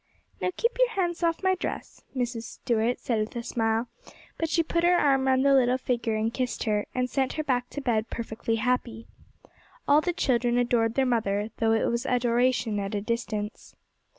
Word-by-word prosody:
'Now - - +1
keep 465 +1 +1
your - - +5
hands 360 -6 -1
off 335 +1 0
my 375 0 +4
dress,' 370 - -5
Mrs. 240 -2 -2
Stuart 230 +1 -1
said 230 -3 -1
with 215 +2 -3
a 235 - -3
smile; 225 0 0 0.5
but 325 - 0
she 330 +1 +2
put 335 +1 -1
her 350 +1 +5
arm 270 -3 +3
round 260 +1 +3
the 280 - +5
little 255 -1 +4
figure 240 -3 -1
and 220 +1 -1
kissed 255 -2 -2
her, 210 -2 0
and 250 0 +1
sent 265 +1 -1
her 310 - -2
back 250 -3 0
to 285 - -6
bed 230 -4 0
perfectly 230 0 -3
happy. 235 -1 -1 0.8
All 290 +2 +6
the 355 - 0
children 245 -6 +1
adored 235 -2 +1
their 270 - +3
mother, 215 -4 0
though 225 -1 +2
it 225 - +2
was 235 +3 -1
adoration 245 -2 +1
at 200 +1 -3
a 205 - -1
distance. 215 -1 -4
245 Hz, 195 wpm, -27 LUFS, 225-270 Hz, 0.8 s, All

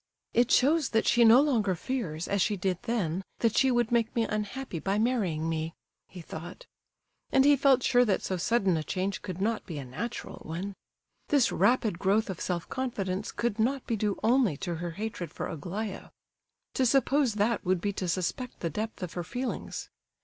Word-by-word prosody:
"It 240 0 +3
shows 295 +2 +4
that 225 - +2
she 240 0 +5
no 230 +2 +8
longer 225 -10 +1
fears, 175 -6 -3
as 200 -1 0
she 205 +3 +1
did 180 -1 -1
then, 190 -6 0 0.2
that 230 -2 +2
she 265 - +4
would 240 -2 +1
make 230 -2 +1
me 230 - +2
unhappy 210 -1 -3
by 195 +5 0
marrying 205 -9 0
me," 160 0 -2 0.3
he 180 - -10
thought. 165 +2 -9 0.7
And 270 0 +5
he 290 0 +7
felt 270 -2 +4
sure 245 -1 +5
that 205 - +1
so 190 - -1
sudden 190 -1 +2
a 155 - -2
change 190 +4 -2
could 185 -2 -6
not 220 +3 0
be 165 - -5
a 140 - -5
natural 135 - -6
one. 180 +5 -5 0.5
This 280 -5 +3
rapid 225 -7 +2
growth 200 +2 +2
of 185 - -8
self 175 -2 -2
confidence 205 -7 -3
could 235 -2 -2
not 260 +4 +1
be 230 - -1
due 210 -2 -1
only 230 - +3
to 175 - -2
her 175 +1 -4
hatred 190 -1 -5
for - - -5
Aglaya. 190 +6 -5 0.6
To 265 - +1
suppose 270 -1 +3
that 215 +2 +1
would 185 -1 +1
be 200 +3 -2
to 185 -2 -3
suspect 185 +8 -2
the 170 - -1
depth 215 +3 -4
of 175 - -5
her 175 - -3
feelings. 245 +7 -5
210 Hz, 195 wpm, -29 LUFS, 180-240 Hz, 0.7 s, no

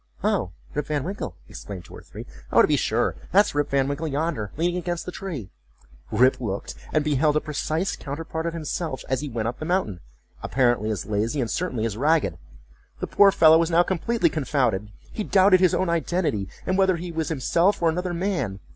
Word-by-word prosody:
"Oh, 200 - +1 0.2
Rip 150 - -2
Van 150 -3 -1
Winkle!" 195 +4 -5
exclaimed 95 -4 -8
two - - -12
or - - -10
three, - - -10 0.3
"Oh, - - +6
to - - +4
be - - +3
sure! - - +1 0.2
that's 205 +3 +4
Rip 145 0 0
Van 135 -1 +2
Winkle 145 +3 -2
yonder, 145 -8 -2
leaning 175 +2 0
against 175 -1 -3
the 180 - -5
tree."Rip 105 - -2
looked, 100 -4 -4 0.2
and 155 - +2
beheld 150 0 +2
a - - +4
precise 155 +4 -2
counterpart 160 +3 -5
of 165 - -3
himself, 155 -3 -3
as 130 -1 0
he 150 - -4
went 115 -2 -2
up 120 - -4
the - - -5
mountain: 175 - 0 0.4
apparently 120 -5 +1
as 105 -3 -3
lazy, 110 +7 -1
and 120 -4 -1
certainly 130 -11 -1
as 110 -2 -3
ragged. 155 +5 +1 0.6
The - - -2
poor 200 -1 +5
fellow 160 -3 +6
was 165 0 +1
now 170 +1 +5
completely 210 +6 0
confounded. 125 -9 0 0.2
He 215 - -3
doubted 190 -1 +5
his 185 -2 +4
own 185 - 0
identity, 170 - -1 0.2
and 185 +1 0
whether 190 -1 +4
he 175 +1 -6
was 160 -1 -2
himself 170 +6 +2
or 170 - +2
another 175 +2 -2
man. 170 - -2
155 Hz, 200 wpm, -24 LUFS, 120-175 Hz, 0.6 s, Oh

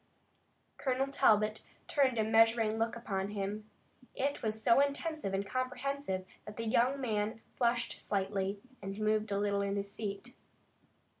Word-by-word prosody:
Colonel 265 0 0
Talbot 215 -5 +3 0.3
turned 265 -4 +2
a 220 - +3
measuring 225 0 +4
look 225 +1 0
upon 195 -5 -2
him. 210 +1 -4 0.5
It 280 +2 -1
was 220 0 -1
so 230 +3 +5
intent 305 +3 0
and 195 0 -1
comprehensive 255 -4 -2 0.2
that 210 - -9
the 230 - -3
young 245 +5 +2
man 220 -3 -1 0.2
flushed 240 -1 0
slightly, 195 0 -1 0.2
and 195 +1 -5
moved 215 0 +1
a 200 - +1
little 200 0 +1
in 200 0 -1
his 200 0 -3
seat. 210 +3 -5
220 Hz, 145 wpm, -33 LUFS, 200-250 Hz, 0.5 s, so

